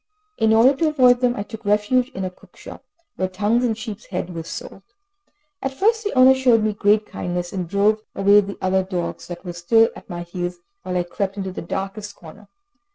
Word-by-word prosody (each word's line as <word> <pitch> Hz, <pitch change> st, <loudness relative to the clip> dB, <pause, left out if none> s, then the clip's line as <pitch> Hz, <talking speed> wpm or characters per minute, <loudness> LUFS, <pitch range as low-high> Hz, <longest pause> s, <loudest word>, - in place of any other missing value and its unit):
In 220 Hz, 0 st, +3 dB
order 235 Hz, +5 st, +5 dB
to 320 Hz, -, +2 dB
avoid 255 Hz, -5 st, +4 dB
them, 245 Hz, -1 st, +1 dB
I 205 Hz, -, -3 dB
took 220 Hz, +1 st, -10 dB
refuge 210 Hz, +5 st, +2 dB
in 190 Hz, -9 st, -5 dB
a 185 Hz, -, -4 dB
cookshop, -, -, -14 dB, 0.3 s
where 185 Hz, -, 0 dB
tongues 205 Hz, +6 st, 0 dB
and 225 Hz, -3 st, 0 dB
sheep's 220 Hz, -2 st, -7 dB
heads 180 Hz, -1 st, -4 dB
were 165 Hz, -1 st, -5 dB
sold. 165 Hz, +3 st, -8 dB, 0.8 s
At 270 Hz, 0 st, -3 dB
first 445 Hz, +7 st, +2 dB
the 415 Hz, -, -2 dB
owner 260 Hz, 0 st, +7 dB
showed 250 Hz, -4 st, +3 dB
me 215 Hz, -1 st, +1 dB
great 205 Hz, +1 st, +2 dB
kindness, 175 Hz, -2 st, -4 dB
and 180 Hz, -3 st, -4 dB
drove 205 Hz, +3 st, +2 dB
away 200 Hz, +1 st, +5 dB
the 200 Hz, 0 st, -7 dB
other 190 Hz, 0 st, +2 dB
dogs 180 Hz, -2 st, -4 dB
that 175 Hz, +2 st, -8 dB
were 175 Hz, -, -5 dB
still 225 Hz, +7 st, +3 dB
at -, -, -13 dB
my 175 Hz, -1 st, -5 dB
heels, 175 Hz, 0 st, -5 dB, 0.2 s
while 180 Hz, 0 st, -3 dB
I 175 Hz, -, +1 dB
crept 195 Hz, +3 st, -4 dB
into 190 Hz, -1 st, -3 dB
the -, -, -6 dB
darkest 195 Hz, +4 st, -5 dB
corner. 170 Hz, +5 st, -14 dB
205 Hz, 210 wpm, -21 LUFS, 185-230 Hz, 0.8 s, owner